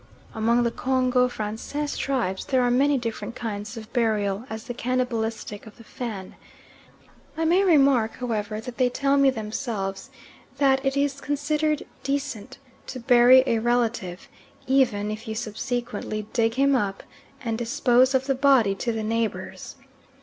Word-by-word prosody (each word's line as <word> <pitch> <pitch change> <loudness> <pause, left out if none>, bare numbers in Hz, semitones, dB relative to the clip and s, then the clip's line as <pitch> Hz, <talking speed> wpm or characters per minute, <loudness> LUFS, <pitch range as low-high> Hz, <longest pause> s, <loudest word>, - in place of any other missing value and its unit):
Among 235 +2 +2
the 235 - +1
Congo 255 -1 +2
Francais 245 +6 -4
tribes 235 -9 -1
there 260 -2 +2
are 245 - +2
many 280 +3 +3
different 235 0 -5
kinds 215 -2 -5
of 220 -1 -10
burial 215 -3 0
as 220 0 -6
the 245 - -6
cannibalistic 230 -4 -2
of 215 - -14
the 230 - -14
Fan. 215 -5 -7 1.0
I 325 - 0
may 355 +4 +4
remark, 275 - +4
however, 215 -3 -3
that 235 +2 -8
they 250 -1 +4
tell 275 +2 +1
me 275 -1 +5
themselves 215 -2 -4 0.5
that 270 -1 +3
it 270 0 0
is 280 -1 0
considered 300 +1 -1 0.2
decent 275 -4 -3 0.3
to 255 - -6
bury 245 +1 +6
a 230 -4 +1
relative, 230 -6 -1 0.4
even 240 -6 +2
if 215 +1 -7
you 220 - -4
subsequently 220 -1 -4
dig 225 -1 +1
him 275 +1 +3
up 200 -5 -1 0.4
and 230 -2 -1
dispose 250 +2 +2
of 265 0 +1
the 270 - +1
body 265 -6 +4
to 235 +4 -2
the 220 -1 -3
neighbours. 225 0 -3
240 Hz, 150 wpm, -25 LUFS, 220-265 Hz, 1.0 s, bury